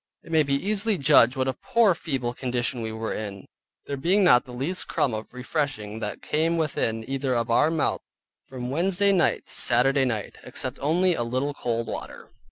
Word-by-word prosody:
It - - -12
may 160 -1 +4
be 140 -2 +1
easily 205 +6 0
judged 135 -5 +5
what 130 0 0
a 130 - 0
poor 220 - +2
feeble 135 -8 -3
condition 125 -1 -1
we 110 -1 -4
were 110 0 -4
in, 100 -3 -6 0.4
there 140 - -3
being 185 +9 +2
not 125 -9 +5
the 125 - -11
least 140 +9 -3
crumb 130 - 0
of 110 0 -6
refreshing 125 -5 -3
that 105 -2 -5
came 165 +2 +1
within 115 -8 -1
either 135 -1 -1
of 115 0 -1
our 150 +6 +4
mouths 160 -2 0 0.5
from 125 -1 -6
Wednesday 190 +6 +2
night 185 -4 +2
to - - -10
Saturday 135 +3 +2
night, 115 -5 -3
except 130 +1 -5
only 175 +5 +2
a 140 - -2
little 130 +5 -1
cold 115 -4 -2
water. - - -7
135 Hz, 190 wpm, -25 LUFS, 120-160 Hz, 0.5 s, judged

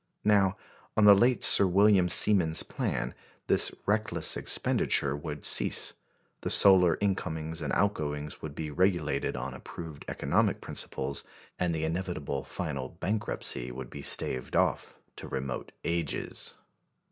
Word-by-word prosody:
Now, 100 -2 +3 0.4
on 105 - +4
the 105 - +9
late 120 +5 +2
Sir 100 - +7
William 95 -1 +4
Siemens's 90 -7 +4
plan, - - -3 0.3
this - - +2
reckless 105 -6 +1
expenditure 70 0 +1
would 75 0 -6
cease; - - +5 0.5
the - - -3
solar 90 -4 +5
incomings 80 -5 -3
and 75 - -3
outgoings 75 -7 -2
would 75 -2 -8
be 75 -1 -5
regulated 85 -5 0
on 65 +1 -5
approved 80 -1 -10
economic - - 0
principles, 70 +1 -3 0.4
and 90 -1 0
the 80 - -3
inevitable 80 -5 -4
final 70 - -5
bankruptcy 95 - -2
would 65 0 -9
be 70 - -8
staved 65 -2 +1
off - - 0 0.2
to - - -8
remote 65 -1 -5
ages. 85 -3 -3
80 Hz, 130 wpm, -28 LUFS, 75-95 Hz, 0.5 s, the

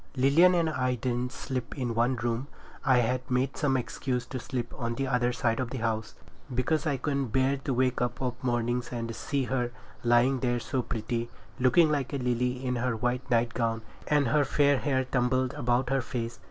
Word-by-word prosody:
Lilian 150 +8 +5
and 170 -2 +2
I 130 -5 0
didn't 125 +1 -2
sleep 130 -1 -5
in 125 -3 -1
one 120 +3 +2
room 120 +2 -2 0.4
now. 135 - +4
I - - +5
had 125 +2 -1
made 130 +2 +1
some 135 -3 +1
excuse 125 0 -2
to 130 - -5
sleep 120 -1 -4
on 120 -1 -3
the 135 - -1
other 125 -2 +2
side 120 -1 0
of 130 -2 -1
the 130 - -4
house, 110 -2 -2 0.4
because 150 +5 +1
I 140 -2 +1
couldn't 140 0 -1
bear 130 +4 +2
to 135 0 -4
wake 130 0 +1
up 120 -1 -1
of 125 -2 -1
mornings 120 0 0
and 115 -2 -4
see 140 +4 -1
her 125 -1 -1 0.3
lying 120 +3 +4
there 120 -1 0
so 130 +2 -1
pretty, 115 +1 -3 0.3
looking 150 +6 +5
like 140 -3 -1
a - - 0
lily 125 0 -1
in 125 -1 0
her 120 0 0
white 125 +3 -2
nightgown 115 -1 +1 0.2
and 145 -2 +3
her 150 -1 +4
fair 140 0 +3
hair 140 -2 0
all 130 - +1
tumbled 130 0 +1
about 120 +2 0
her 135 -1 +2
face. 115 -2 -4
125 Hz, 205 wpm, -28 LUFS, 120-135 Hz, 0.4 s, Lilian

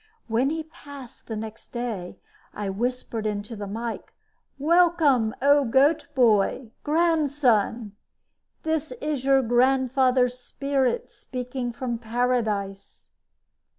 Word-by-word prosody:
When 240 +4 +1
he 320 +1 -3
passed 285 -7 -13
next 220 0 -6
day, 225 -7 -4 0.4
I 205 -1 -3
whispered 230 0 -2
into 210 +2 -4
the 205 -1 -6
mike: 225 +3 -5 0.5
"Welcome, 305 -7 +3
O 285 0 +5
Goat 275 +6 +3
boy 225 -1 +2
Grandson! 285 -9 +1 0.7
This 315 -2 -1
is 290 0 -3
your 270 0 +4
grandfather's 255 +1 +2
spirit 275 - -1
speaking 250 -1 -5
from 240 -1 -4
paradise." 220 -4 -2
250 Hz, 100 wpm, -25 LUFS, 225-280 Hz, 0.7 s, O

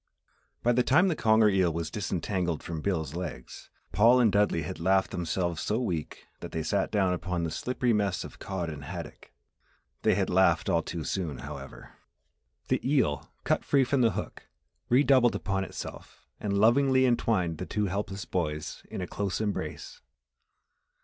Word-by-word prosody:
By 120 - +4
the 125 +1 +3
time 160 +10 +4
the 165 - 0
conger 110 -3 +4
eel 95 -4 +3
was 80 0 -4
disentangled 95 -4 -2
from 80 -2 -5
Bill's 80 -7 -1
legs, 85 -7 -7 0.2
Paul 120 +4 +5
and 115 -4 +4
Dudley 100 -5 +2
had 80 - -6
laughed 95 +3 +2
themselves 85 -1 -2
so 110 +2 0
weak 85 -11 -4
that - - -8
they 80 - -2
sat 95 +5 0
down 95 -4 +2
upon 90 -1 -2
the 80 - -2
slippery 125 +3 0
mess 100 -3 0
of - - -11
cod 95 -3 -4
and 75 -2 -8
haddock. - - -8 0.7
They - - +3
had - - +1
laughed 90 -1 +3
all 85 -3 +3
too 85 0 -5
soon, 80 -7 -3
however! 70 -2 -10 0.7
The - - +1
eel, 130 - +1
cut - - +1
free 140 -2 +3
from 130 +1 +1
the 115 -4 +3
hook, - - -6 0.4
redoubled 130 -1 +4
upon 95 +1 -1
itself - - -9
and 100 -1 -1
lovingly 130 +5 +4
entwined 105 -9 +1
the 90 - -5
two 105 -1 -1
helpless 100 +1 -3
boys 75 -4 -3
in - - -5
a 90 - -3
close 100 0 -2
embrace. 80 -8 -4
95 Hz, 170 wpm, -28 LUFS, 85-110 Hz, 0.7 s, Paul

